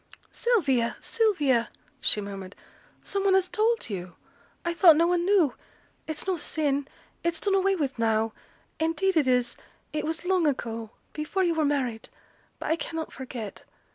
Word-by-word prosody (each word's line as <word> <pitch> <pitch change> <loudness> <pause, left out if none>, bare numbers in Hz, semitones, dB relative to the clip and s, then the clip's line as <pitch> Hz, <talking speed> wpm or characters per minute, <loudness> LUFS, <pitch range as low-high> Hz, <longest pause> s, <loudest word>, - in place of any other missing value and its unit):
'Sylvia, 280 - +1
Sylvia,' 295 - +2 0.3
she - - +3
murmured, 195 -1 -7 0.5
'some 395 -1 -2
one 390 -1 +4
has 380 -1 +3
told 455 +4 +1
you 180 -4 -6 0.5
I 340 - 0
thought 340 -2 +7
no 330 +2 +4
one 350 0 +1
knew 365 -9 +4 0.5
it's 315 -1 -3
no 375 -2 0
sin 285 -3 0 0.4
it's 340 -1 0
done 400 - +1
away 390 0 +3
with 275 -7 -2
now 225 -1 +1 0.5
indeed 330 +4 +1
it 300 -5 +3
is 250 -1 +2 0.4
it 305 - -1
was 320 +2 -3
long 365 -3 +3
ago 230 -5 -2 0.2
before 310 +5 -1
yo' 345 -2 +2
were 315 -2 +1
married; 255 -6 -1 0.5
but - - -3
I 325 - +2
cannot 325 -1 -5
forget. 245 -6 -7
310 Hz, 160 wpm, -27 LUFS, 250-365 Hz, 0.5 s, thought